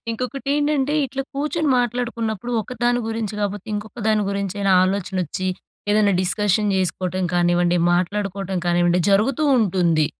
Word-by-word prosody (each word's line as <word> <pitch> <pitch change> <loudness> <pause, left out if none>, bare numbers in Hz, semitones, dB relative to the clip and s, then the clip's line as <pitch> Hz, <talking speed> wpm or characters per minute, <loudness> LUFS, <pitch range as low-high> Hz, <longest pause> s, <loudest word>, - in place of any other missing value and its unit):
ఇంకొకటి 255 +3 -4
ఏంటంటే, 290 -1 +1
ఇట్ల 270 +2 -5
కూర్చొని 300 +2 -1
మాట్లాడుకున్నప్పుడు. 240 -2 -2
ఒకదాని 245 +2 0
గురించి 225 -2 -3
కాకపోతే 205 0 -3
ఇంకొక 210 +3 -6
దాని 215 -1 +2
గురించైనా, 200 0 -1
ఆలోచన 190 0 -2
వచ్చి 185 +4 -3 0.4
ఏదైనా 210 -1 +3
డిస్కషన్ 205 +1 +1
చేసుకోవటం 185 0 -1
కానివ్వండి, 175 0 +2 0.2
మాట్లాడుకోవటం 195 +1 -1
కానివ్వండి, 175 0 +3
జరుగుతూ 235 +9 +2
ఉంటుంది. 170 -7 +2
205 Hz, 125 wpm, -21 LUFS, 185-240 Hz, 0.4 s, ఏదైనా